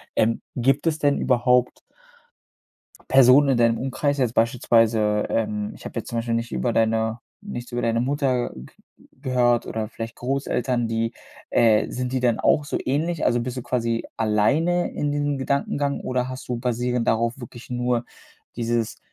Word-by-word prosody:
Ähm, 115 Hz, +1 st, +1 dB
gibt 135 Hz, +5 st, +1 dB
es 155 Hz, -1 st, +1 dB
denn 145 Hz, -1 st, +2 dB
überhaupt 125 Hz, 0 st, +2 dB, 1.3 s
Personen 135 Hz, +2 st, +6 dB
in 130 Hz, -, +3 dB
deinem 115 Hz, -1 st, +3 dB
Umkreis 140 Hz, +2 st, -1 dB
jetzt 125 Hz, -3 st, 0 dB
beispielsweise, 115 Hz, -3 st, +2 dB
ähm 105 Hz, -2 st, -1 dB
ich -, -, -14 dB
habe -, -, -5 dB
jetzt -, -, -6 dB
zum 115 Hz, -, -2 dB
Beispiel 115 Hz, 0 st, -1 dB
nicht 115 Hz, +1 st, -3 dB
über 120 Hz, -, 0 dB
deine 110 Hz, 0 st, +1 dB, 0.2 s
nichts 125 Hz, -12 st, -7 dB
über 120 Hz, -, -2 dB
deine 115 Hz, 0 st, +1 dB
Mutter 130 Hz, -1 st, 0 dB
ge 65 Hz, 0 st, -10 dB, 0.5 s
gehört 125 Hz, -3 st, +2 dB
oder 110 Hz, -1 st, -3 dB
vielleicht 115 Hz, +1 st, -7 dB
Großeltern, 125 Hz, -2 st, -1 dB
die, 115 Hz, 0 st, -1 dB, 0.4 s
äh 110 Hz, -2 st, +3 dB
sind 125 Hz, 0 st, -3 dB
die 130 Hz, -, 0 dB
dann 120 Hz, -2 st, +2 dB
auch 150 Hz, -, +2 dB
so -, -, -2 dB
ähnlich? 155 Hz, +5 st, 0 dB
Also 120 Hz, -, +2 dB
bist 125 Hz, +2 st, -4 dB
du 125 Hz, -, -4 dB
quasi 115 Hz, -2 st, -1 dB
alleine 140 Hz, +12 st, +1 dB
in 145 Hz, -, -2 dB
diesem 145 Hz, -1 st, -1 dB
Gedankengang 140 Hz, +1 st, -1 dB
oder 125 Hz, 0 st, -2 dB
hast 130 Hz, 0 st, -8 dB
du 120 Hz, -, -1 dB
basierend 125 Hz, 0 st, -1 dB
darauf 115 Hz, +3 st, 0 dB
wirklich 120 Hz, 0 st, -10 dB
nur 125 Hz, -1 st, -1 dB, 0.5 s
dieses 115 Hz, -1 st, -2 dB
120 Hz, 165 wpm, -23 LUFS, 115-135 Hz, 1.3 s, Personen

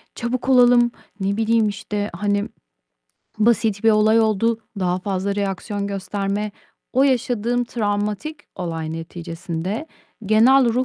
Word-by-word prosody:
çabuk 250 Hz, +2 st, -3 dB
olalım." 245 Hz, -1 st, +6 dB, 0.3 s
ne 200 Hz, +1 st, -1 dB
bileyim, 225 Hz, -1 st, +2 dB
işte, 205 Hz, 0 st, -4 dB
hani, 205 Hz, +1 st, 0 dB, 0.9 s
basit 220 Hz, -1 st, +2 dB
bir 225 Hz, -, +7 dB
olay 215 Hz, +1 st, +4 dB
oldu, 225 Hz, +1 st, +1 dB, 0.2 s
daha 180 Hz, 0 st, +1 dB
fazla 195 Hz, 0 st, -2 dB
reaksiyon 200 Hz, 0 st, -2 dB
gösterme. 200 Hz, +1 st, -2 dB, 0.4 s
O 265 Hz, -, +3 dB
yaşadığım 245 Hz, -2 st, +1 dB
travmatik 210 Hz, +7 st, -2 dB, 0.2 s
olay 165 Hz, -3 st, -4 dB
neticesinde 170 Hz, -, -5 dB, 0.4 s
genel 245 Hz, +5 st, +6 dB
ruh 255 Hz, +1 st, +2 dB
210 Hz, 115 wpm, -21 LUFS, 195-235 Hz, 0.9 s, bir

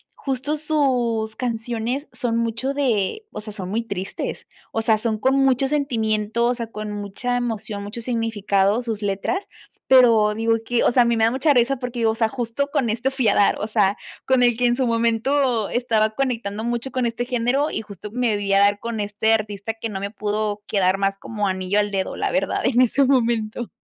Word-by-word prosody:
justo 275 Hz, +3 st, -2 dB
sus 250 Hz, -8 st, 0 dB
canciones 240 Hz, +3 st, -3 dB
son 230 Hz, -2 st, -1 dB
mucho 230 Hz, +4 st, -1 dB
de, 270 Hz, -, 0 dB
o -, -, -6 dB
sea, 215 Hz, -1 st, -7 dB
son 185 Hz, -3 st, -6 dB
muy 225 Hz, +3 st, -1 dB
tristes, 195 Hz, -4 st, -5 dB, 0.3 s
o 225 Hz, -, -1 dB
sea, 220 Hz, -1 st, +3 dB
son 220 Hz, 0 st, -1 dB
con 265 Hz, +4 st, +2 dB
mucho 270 Hz, -1 st, +3 dB
sentimiento, 230 Hz, -5 st, 0 dB
o 245 Hz, +1 st, +2 dB
sea, 230 Hz, -2 st, -5 dB
con 210 Hz, 0 st, -5 dB
mucha 205 Hz, +5 st, -3 dB
emoción, 220 Hz, -4 st, -3 dB
mucho 215 Hz, +3 st, -7 dB
significado 220 Hz, -2 st, +1 dB
sus 225 Hz, -3 st, -4 dB
letras, 205 Hz, -, -2 dB, 0.4 s
pero 230 Hz, -5 st, +6 dB
digo 225 Hz, +1 st, +1 dB
que 240 Hz, 0 st, +1 dB
o -, -, +4 dB
sea, 245 Hz, 0 st, +4 dB
a -, -, 0 dB
mí 235 Hz, -1 st, +1 dB
me 220 Hz, -, +4 dB
da 230 Hz, -, +2 dB
mucha 275 Hz, +3 st, +2 dB
risa 250 Hz, +2 st, +3 dB
porque, 245 Hz, -2 st, -3 dB
o 220 Hz, 0 st, +2 dB
sea, 225 Hz, -1 st, +1 dB
justo 255 Hz, +3 st, -2 dB
con 240 Hz, -5 st, +1 dB
esto 240 Hz, +5 st, 0 dB
fui 260 Hz, -4 st, 0 dB
a 200 Hz, -, +4 dB
dar, 205 Hz, -, +3 dB
o 210 Hz, -, -2 dB
sea, 205 Hz, -2 st, +2 dB, 0.3 s
con 260 Hz, -1 st, +3 dB
el 240 Hz, -1 st, +4 dB
que 245 Hz, -, +1 dB
en 240 Hz, 0 st, +2 dB
su 260 Hz, -2 st, +1 dB
momento 230 Hz, +1 st, +1 dB
estaba 220 Hz, -3 st, +1 dB
conectando 225 Hz, -4 st, -2 dB
mucho 240 Hz, +2 st, -2 dB
con 255 Hz, -1 st, -1 dB
este 235 Hz, +1 st, -2 dB
género 250 Hz, +4 st, 0 dB
y -, -, -2 dB
justo 210 Hz, 0 st, -10 dB
me 245 Hz, -4 st, +1 dB
vi 200 Hz, -1 st, -1 dB
a 195 Hz, -, +5 dB
dar 205 Hz, 0 st, +4 dB
con 230 Hz, -2 st, -3 dB
este 210 Hz, +2 st, +1 dB
artista 210 Hz, 0 st, -2 dB
que 225 Hz, 0 st, -5 dB
no 195 Hz, -2 st, -4 dB
me 200 Hz, +1 st, -3 dB
pudo 210 Hz, -1 st, -2 dB
quedar 190 Hz, -2 st, +2 dB
más 195 Hz, 0 st, 0 dB
como 210 Hz, -2 st, -3 dB
anillo 185 Hz, +2 st, 0 dB
al 205 Hz, 0 st, 0 dB
dedo, 195 Hz, -1 st, -2 dB
la -, -, -1 dB
verdad -, -, 0 dB
en 250 Hz, -1 st, +2 dB
ese 255 Hz, +3 st, +3 dB
momento. 235 Hz, -3 st, 0 dB
230 Hz, 210 wpm, -22 LUFS, 210-245 Hz, 0.4 s, pero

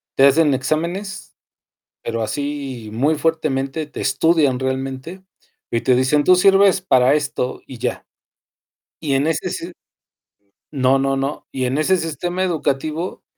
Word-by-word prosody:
te 135 Hz, -, +6 dB
hacen 145 Hz, 0 st, +4 dB
exámenes, 170 Hz, +8 st, -3 dB, 0.7 s
pero 115 Hz, -1 st, -2 dB
así 135 Hz, -2 st, -4 dB
muy 145 Hz, +7 st, +1 dB
fuertemente 155 Hz, -2 st, -1 dB
te 150 Hz, -, -8 dB
estudian 145 Hz, -2 st, +2 dB
realmente 135 Hz, +7 st, -4 dB, 0.5 s
y 115 Hz, -, +1 dB
te 125 Hz, -1 st, +3 dB
dicen: 135 Hz, +3 st, +2 dB
"Tú 185 Hz, +3 st, +5 dB
sirves 195 Hz, 0 st, +5 dB
para 130 Hz, -6 st, +4 dB
esto 145 Hz, -4 st, -2 dB
y 125 Hz, -, -10 dB
ya". -, -, -3 dB, 0.9 s
Y 145 Hz, -4 st, -2 dB
en 135 Hz, +2 st, +2 dB
ese 165 Hz, +3 st, -1 dB
si 170 Hz, +1 st, -5 dB, 1.0 s
No, 135 Hz, -1 st, +2 dB
no, 135 Hz, 0 st, 0 dB
no. 135 Hz, +2 st, -4 dB
Y 130 Hz, -1 st, -2 dB
en 130 Hz, +4 st, -1 dB
ese 185 Hz, +4 st, +3 dB
sistema 175 Hz, +3 st, -3 dB
educativo, 160 Hz, 0 st, -2 dB
145 Hz, 140 wpm, -20 LUFS, 130-165 Hz, 1.0 s, te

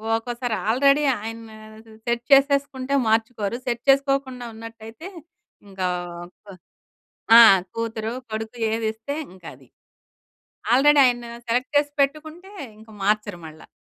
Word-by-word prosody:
ఓకోసారి 240 Hz, 0 st, -3 dB
already 275 Hz, +5 st, +3 dB, 0.2 s
ఆయన 225 Hz, 0 st, -8 dB, 0.6 s
set 235 Hz, 0 st, -1 dB
చేసేసుకుంటే 275 Hz, -1 st, +2 dB
మార్చుకోరు. 225 Hz, 0 st, -1 dB
Set 240 Hz, 0 st, -3 dB
చేసుకోకుండా 270 Hz, -2 st, +1 dB
ఉన్నట్ట‌యితే, 225 Hz, -, -11 dB, 0.6 s
ఇంకా 190 Hz, -1 st, -3 dB, 0.4 s
అప్ 195 Hz, +2 st, -16 dB, 0.8 s
ఆ! -, -, +11 dB, 0.4 s
కూతురు, 225 Hz, 0 st, -4 dB, 0.2 s
కొడుకు 220 Hz, +2 st, -6 dB
ఏదిస్తే 220 Hz, +4 st, -3 dB, 0.2 s
ఇంకది. 180 Hz, -3 st, -13 dB, 1.1 s
ఆల్రెడీ 290 Hz, +3 st, +5 dB
ఆయన 240 Hz, -1 st, 0 dB, 0.2 s
సెలెక్ట్ 250 Hz, +5 st, -1 dB
చేసి 290 Hz, 0 st, +1 dB
పెట్టుకుంటే, 310 Hz, +7 st, -3 dB, 0.3 s
ఇంక 220 Hz, +1 st, -17 dB
మార్చరు 210 Hz, -2 st, 0 dB
మళ్ళా. 155 Hz, 0 st, -14 dB
235 Hz, 105 wpm, -22 LUFS, 220-275 Hz, 1.1 s, ఆ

